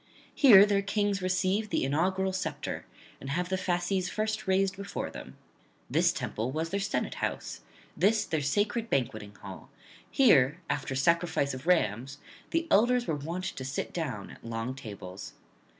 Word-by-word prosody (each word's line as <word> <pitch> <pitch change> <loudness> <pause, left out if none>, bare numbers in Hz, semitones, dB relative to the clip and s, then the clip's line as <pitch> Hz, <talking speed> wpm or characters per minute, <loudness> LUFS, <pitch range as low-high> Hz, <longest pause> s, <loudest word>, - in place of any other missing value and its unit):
Here 210 -9 +8
their 200 -1 +2
kings 200 -1 0
receive 185 +3 0
the - - 0
inaugural 185 +7 0
sceptre, 160 -6 -4 0.3
and 135 - -7
have 175 +5 -1
the 190 - +1
fasces 185 +1 -1
first 215 -1 -2
raised 190 +1 +2
before 200 0 -5
them; - - -10 0.5
this - - +4
temple 110 +3 -3
was 160 +3 -3
their 200 - 0
senate 200 +1 -1
house; - - -3 0.3
this 215 +3 +3
their 160 -2 -1
sacred 205 +10 0
banqueting 110 - -2
hall; 95 -2 -10 0.4
here, 160 - +4
after 135 -1 -2
sacrifice 165 -1 +1
of 130 +5 -8
rams, 135 - +1 0.3
the 330 0 0
elders 245 +1 +4
were 160 - -1
wont 165 +5 -4
to 185 -8 -4
sit 135 +2 -4
down 135 - -4
at - - -15
long 115 +2 -3
tables. 100 -7 -9
175 Hz, 155 wpm, -29 LUFS, 135-200 Hz, 0.5 s, Here